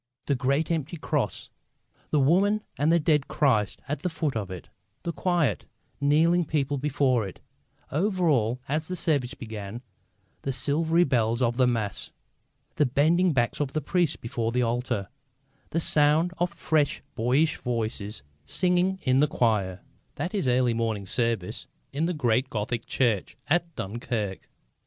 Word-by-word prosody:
The 140 - +1
great 140 +5 0
empty 165 +1 -2
Cross; 150 -3 -2 0.6
the 150 - +2
woman 195 +9 +3
and 150 +3 +2
the 170 - +5
dead 150 -2 +2
Christ 110 -9 +1
at 145 0 -2
the 180 - -1
foot 160 -5 -2
of 105 -4 -3
it; 90 -2 -8 0.4
the 170 - -2
quiet, 170 - 0 0.3
kneeling 160 +5 +4
people 145 -3 -1
before 130 -5 +1
it; 95 - -11 0.5
over 185 +3 +1
all, 125 -4 +2
as 155 +3 -1
the 185 - -3
services 145 -6 0
began, 110 0 -7 0.6
the 135 - -2
silvery 160 +6 +2
bell 115 -7 +2
of 120 0 +1
the 130 -1 +4
Mass; 115 -5 -2 0.7
the 150 - +4
bending 165 +8 +3
backs 120 -5 0
of 140 -2 -1
the 155 - +1
priests 175 +2 +1
before 115 0 -3
the 125 +1 +1
altar; 120 -3 -1 0.6
the 165 - 0
sound 155 +2 +3
of 175 +1 +2
fresh, 150 -3 0
boyish 130 +8 +2
voices 110 - -3 0.2
singing 180 +1 +1
in 130 +1 +3
the 150 - +5
choir 105 -9 0 0.3
that 175 +7 -3
is 195 -10 0
early 125 -1 +3
morning 110 -3 -1
service 115 -2 -1 0.3
in 155 +4 0
the 180 - -1
great 125 -2 +1
Gothic 115 +1 -3
church 115 -7 0
at 170 +2 0
Dunkirk. 105 -1 -4
140 Hz, 155 wpm, -27 LUFS, 115-160 Hz, 0.7 s, the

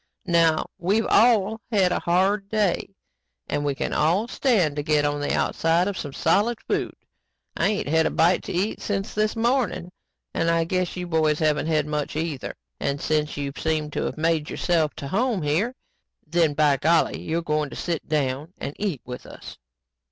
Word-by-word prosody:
"Now 165 -3 +3
we've 200 +6 +1
all 220 -2 +3
had 190 -4 +3
a - - +1
hard 195 +3 +1
day 200 -2 0 0.5
and 145 - -1
we 145 -1 0
can - - -3
all 175 +9 +2
stand 200 - +1
to - - 0
get 150 -1 +2
on 145 0 0
the 145 - -1
outside 165 +3 +1
of 200 - -2
some 145 -5 -5
solid 205 - +1
food. - - -2 0.6
I - - +2
ain't 205 -7 -1
had 160 +2 +3
a - - 0
bite 175 +2 +3
to - - -5
eat 190 +5 -1
since 195 -1 -2
this 215 +1 0
morning 230 -6 0 0.4
and 165 - +1
I 165 0 +3
guess 185 +2 -1
you 180 - -3
boys 160 -3 +1
haven't 155 0 +1
had 155 -2 +1
much 150 -1 -3
either. 155 -4 -3 0.2
And 140 0 -1
since 150 0 -1
you've 140 -1 -4
seemed 155 -2 -1
to - - -1
have - - -4
made 160 -1 0
yourselves 165 -4 0
to 140 - -6
home 220 - 0
here, 180 - 0 0.5
then 160 -2 +1
by 145 -2 +3
golly, 160 +4 +2
you're 165 +1 -2
going 150 -2 0
to - - -9
sit 170 -3 -3
down 145 +2 -1
and 140 - -5
eat 190 - -2
with 125 0 -8
us. - - -11
165 Hz, 190 wpm, -24 LUFS, 150-195 Hz, 0.6 s, Now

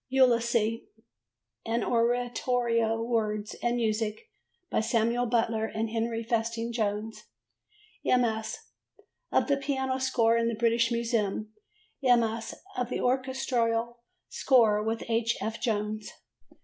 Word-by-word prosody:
Ulysses, 235 -3 +3 0.8
an 230 +1 -1
Oratorio: 235 -1 +1
Words 215 -3 -1
and 240 0 +1
music 220 - -2 0.4
by - - +2
Samuel 235 +2 +1
Butler 225 -1 +1
and 220 0 -3
Henry 230 0 -1
Festing 230 0 -1
Jones: 215 -1 -2 0.8
MS. 225 -3 +1 0.7
of - - +3
the 280 -1 +2
piano 265 -2 -1
score 230 -3 +2
in 230 0 +1
the 230 - -1
British 230 +1 +2
Museum, 220 -3 -1 0.5
MS. 235 -3 +2 0.2
of 250 -1 -2
the - - -2
orchestral 245 -2 0 0.3
score 225 -5 +3
with 225 +1 -2
H. 230 0 +1
F. 220 +3 -4
Jones. 215 -2 -2
230 Hz, 110 wpm, -28 LUFS, 220-245 Hz, 0.8 s, Ulysses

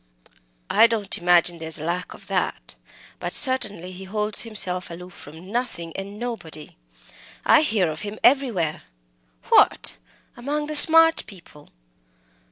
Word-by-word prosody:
"I 230 - +5
don't 215 -4 -1
imagine 175 -1 +2
there 160 - -7
is 160 - -2
any 155 - -6
lack 180 +2 -4
of - - -17
that! - - -4 0.5
But - - -5
certainly 205 - 0
he 185 +1 -11
holds 210 +2 +1
himself 190 -5 -1
aloof 180 +1 -11
from 160 +6 -14
nothing 210 -9 -5
and 200 +1 -8
nobody! 210 -11 -7 0.7
I - - +5
hear 220 - +1
of 155 - -8
him 210 +1 -7
everywhere." 235 - +1 0.7
"What! - - +3 0.4
among 290 +5 -4
the 305 - -6
smart 325 +2 +7
people?" 170 -7 -16
195 Hz, 140 wpm, -22 LUFS, 170-240 Hz, 0.7 s, smart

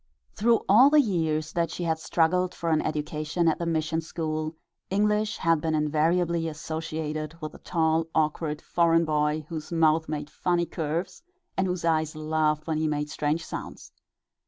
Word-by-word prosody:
Through 230 +2 +3
all 240 +8 +7
the 300 +1 +5
years 160 - 0
that 170 -1 0
she 175 - -5
had 160 -1 0
struggled 180 +3 +1
for 165 -1 -2
an 155 - +3
education 155 +2 -1
at 160 - +2
the 170 - -2
mission 160 0 0
school, 155 -1 -3 0.3
English 210 +2 +1
had 165 -2 +2
been 160 -1 0
invariably 165 +3 +1
associated 155 0 -4
with 155 -2 -6
a - - -12
tall, 160 -1 +1
awkward, 155 -1 0
foreign 170 -1 +3
boy, 150 0 0
whose 155 -1 -6
mouth 160 -1 +3
made 150 -1 -4
funny 175 -1 0
curves 165 - -3 0.3
and 190 - +1
whose 180 -2 -2
eyes 160 -1 +1
laughed 155 0 0
when 160 -1 -1
he 155 - +1
made 150 0 -2
strange 155 +2 -1
sounds. - - -7
160 Hz, 165 wpm, -27 LUFS, 155-170 Hz, 0.3 s, all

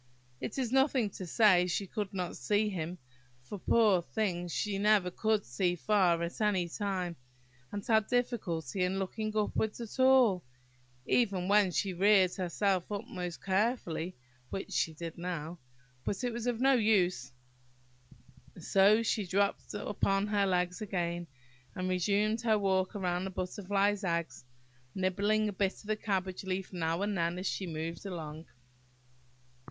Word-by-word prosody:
It 210 - -5
is 250 -4 -1
nothing 265 -5 +2
to 185 - -7
say 180 -2 +5
she 190 +3 -1
could 205 +1 -4
not 180 -3 -3
see 205 +11 +1
him; 175 -2 -4 0.5
for, 200 +10 -7
poor 210 -3 +4
thing! 175 -2 -2
she 195 +3 -2
never 205 -3 +3
could 215 +2 0
see 175 +9 0
far 180 -3 +2
at 170 +5 -5
any 195 -5 +2
time 185 -2 -3 0.6
and 205 -1 -5
had 220 -2 +3
a - - -29
difficulty 195 - -1
in 185 +1 0
looking 215 +3 -3
upwards 215 +1 0
at 235 +1 -8
all, 255 -8 +5 0.6
even 195 - +1
when 205 -1 +5
she 185 +2 -1
reared 190 0 +4
herself 185 +1 -1
up 205 +2 -3
most 180 -7 -6
carefully, 190 -4 0 0.3
which 195 - -5
she 160 - +1
did 165 +1 -7
now; 170 -1 -4 0.4
but 200 - -3
it 245 -1 -1
was 235 +1 -4
of 240 -2 0
no 270 +2 +5
use, 210 - +2 1.3
so 205 +3 +4
she 215 -3 0
dropped 200 +3 0
upon 200 -1 0
her 205 -1 +1
legs 180 +1 0
again, 175 -4 -2 0.5
and 185 0 -2
resumed 205 +5 +1
her 220 -2 +3
walk 190 0 0
round 180 -1 -1
the - - -4
Butterfly's 200 +2 -1
eggs, 170 -8 -2 0.5
nibbling 200 +3 +1
a 205 - -3
bit 195 0 0
of - - -15
the 215 +1 -1
cabbage 190 -4 -2
leaf 190 0 -4
now 165 +1 -1
and 205 0 -1
then 170 0 0
as 185 - -5
she 190 - -2
moved 165 +1 -5
along. 160 -3 -7
195 Hz, 155 wpm, -31 LUFS, 180-210 Hz, 1.3 s, say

